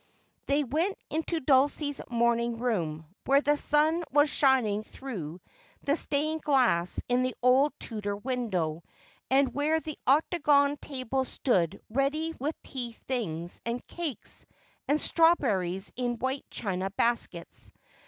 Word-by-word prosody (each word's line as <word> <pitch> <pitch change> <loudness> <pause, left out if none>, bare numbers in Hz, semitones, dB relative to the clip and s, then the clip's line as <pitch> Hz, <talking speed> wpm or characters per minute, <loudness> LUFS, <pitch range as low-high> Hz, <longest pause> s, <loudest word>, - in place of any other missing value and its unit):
They 285 +1 +2
went 320 - -1
into 320 +2 -1
Dulcie's 285 +1 +2
morning 235 0 +1
room, 170 -10 -2 0.2
where 275 +1 +6
the 295 0 +2
sun 310 +3 +2
was 290 +1 +4
shining 250 -7 +3
through 190 - -7 0.4
the 285 - +2
stained 310 0 0
glass 240 - +2
in 245 +1 +2
the 255 0 -1
old 260 +3 +5
Tudor 205 -3 -4
window, 205 -10 -2 0.5
and 265 -1 +3
where 300 +3 +1
the 310 -1 -7
octagon 285 0 +3
table 265 -2 -2
stood 195 - 0
ready 285 +7 0
with 295 +5 -2
tea 245 -4 -5
things, 175 -10 -4
and 235 +1 -3
cakes, 320 - -6 0.4
and 290 +2 +2
strawberries 210 - +2
in 245 -1 -1
white 260 +3 -2
china 190 -3 -2
baskets. 200 -5 -2
260 Hz, 125 wpm, -29 LUFS, 215-290 Hz, 0.5 s, where